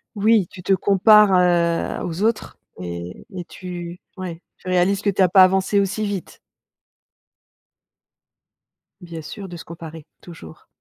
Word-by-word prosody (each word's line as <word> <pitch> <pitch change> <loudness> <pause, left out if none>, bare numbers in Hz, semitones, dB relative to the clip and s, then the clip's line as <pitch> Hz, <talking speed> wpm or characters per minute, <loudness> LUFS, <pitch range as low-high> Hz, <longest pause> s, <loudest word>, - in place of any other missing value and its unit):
Oui, 210 -3 +3
tu 180 - -11
te 195 - +1
compares, 205 +2 +5
heu, 175 -2 +1
aux 175 +2 -4
autres 225 +1 -1 0.2
et 85 - -7
et 180 - -5
tu 175 -1 -8 0.2
ouais, 180 -3 -7
tu - - -12
réalises 185 +2 +1
que 205 - +2
tu 195 - +1
as 185 - +5
pas 185 +1 +6
avancé 190 +2 +2
aussi 200 +2 -1
vite. 200 -3 -6 2.6
Bien 170 -3 -8
sûr, 195 +5 -8
de 175 - -8
se - - -10
comparer. 165 -2 -10
Toujours. 165 -2 -13
180 Hz, 145 wpm, -21 LUFS, 170-195 Hz, 2.6 s, pas